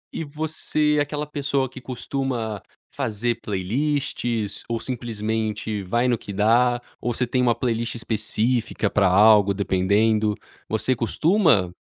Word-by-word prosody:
E 165 Hz, -, -2 dB
você 150 Hz, 0 st, 0 dB
é -, -, +3 dB
aquela 150 Hz, +1 st, -2 dB
pessoa 140 Hz, -2 st, -1 dB
que 130 Hz, 0 st, -11 dB
costuma 125 Hz, -4 st, -3 dB, 0.3 s
fazer 115 Hz, +3 st, -1 dB
playlists 115 Hz, +1 st, -2 dB
ou 115 Hz, -1 st, -1 dB
simplesmente 110 Hz, -3 st, -3 dB
vai 120 Hz, +7 st, +1 dB
no 120 Hz, -3 st, +1 dB
que -, -, -8 dB
dá, 120 Hz, +5 st, +3 dB, 0.2 s
ou 120 Hz, -, -1 dB
você 125 Hz, +2 st, 0 dB
tem 125 Hz, +1 st, 0 dB
uma 120 Hz, -2 st, +3 dB
playlist 115 Hz, 0 st, -1 dB
específica 110 Hz, 0 st, -1 dB
para 100 Hz, -2 st, +3 dB
algo, 100 Hz, +1 st, +5 dB
dependendo, 105 Hz, +3 st, +2 dB, 0.3 s
você 110 Hz, +4 st, +1 dB
costuma, 125 Hz, -, +2 dB
115 Hz, 130 wpm, -23 LUFS, 105-130 Hz, 0.3 s, algo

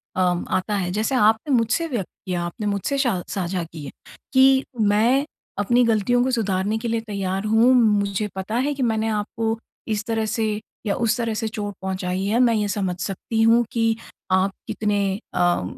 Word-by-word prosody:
अ, -, -, -2 dB, 0.3 s
आता 205 Hz, +3 st, 0 dB
है 180 Hz, -3 st, -1 dB
जैसे 215 Hz, +7 st, 0 dB
आपने 225 Hz, +4 st, +3 dB
मुझसे 245 Hz, +9 st, +1 dB
व्यक्त 235 Hz, -, -3 dB, 0.2 s
किया 180 Hz, -2 st, -2 dB
आपने 210 Hz, +4 st, -4 dB
मुझसे 205 Hz, +8 st, -1 dB
श 185 Hz, -7 st, 0 dB
साझा 180 Hz, -2 st, -2 dB
किए 155 Hz, -4 st, -9 dB, 0.4 s
कि 265 Hz, 0 st, +5 dB, 0.2 s
मैं 225 Hz, +7 st, +3 dB, 0.3 s
अपनी 240 Hz, +4 st, +3 dB
गलतियों 230 Hz, +2 st, +2 dB
को 260 Hz, -, 0 dB
सुधारने 205 Hz, -2 st, 0 dB
के 230 Hz, +1 st, -4 dB
लिए 230 Hz, 0 st, 0 dB
तैयार 195 Hz, -3 st, -3 dB
हूँ। 225 Hz, +4 st, +5 dB
मुझे 210 Hz, -3 st, +2 dB
पता 190 Hz, +4 st, -4 dB
है 280 Hz, +4 st, +1 dB
कि 270 Hz, -2 st, -2 dB
मैंने 220 Hz, -1 st, +1 dB
आपको 220 Hz, +1 st, -1 dB, 0.3 s
इस 215 Hz, -1 st, -1 dB
तरह 225 Hz, -1 st, -1 dB
से 215 Hz, -1 st, -1 dB, 0.3 s
या 200 Hz, -, 0 dB
उस 230 Hz, 0 st, +1 dB
तरह 230 Hz, -2 st, -1 dB
से 220 Hz, 0 st, -2 dB
चोट 205 Hz, -1 st, -4 dB
पहुँचाई 190 Hz, 0 st, -2 dB
है। 215 Hz, +4 st, +1 dB
मैं 245 Hz, -2 st, +4 dB
ये 210 Hz, -1 st, 0 dB
समझ 190 Hz, -3 st, -1 dB
सकती 200 Hz, +4 st, -2 dB
हूँ 230 Hz, +1 st, +5 dB
कि 225 Hz, -1 st, +1 dB, 0.4 s
आप 190 Hz, +1 st, +3 dB, 0.2 s
कितने 205 Hz, -1 st, 0 dB, 0.3 s
अ, 175 Hz, -, +2 dB
215 Hz, 185 wpm, -23 LUFS, 195-230 Hz, 0.4 s, कि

